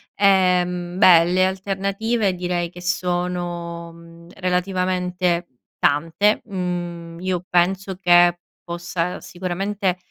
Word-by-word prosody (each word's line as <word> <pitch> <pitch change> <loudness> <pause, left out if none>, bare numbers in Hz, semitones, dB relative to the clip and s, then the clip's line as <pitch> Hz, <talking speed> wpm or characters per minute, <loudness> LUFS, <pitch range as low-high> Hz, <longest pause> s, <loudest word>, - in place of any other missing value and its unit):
Ehm, 180 -2 +2
beh 175 -4 +7
le 185 +2 +2
alternative 195 +3 -1
direi 175 -1 -2
che 175 +1 -12
sono, 175 -1 -3
mhmm, 170 0 -15
relativamente 180 -1 -1 0.3
tante. 165 +8 +2
Mhmm, 175 -3 -5
io 180 -1 -2
penso 190 +2 +1
che 175 -1 +5 0.2
possa 170 +1 -3
sicuramente, 185 +1 -2
180 Hz, 95 wpm, -21 LUFS, 175-190 Hz, 0.3 s, beh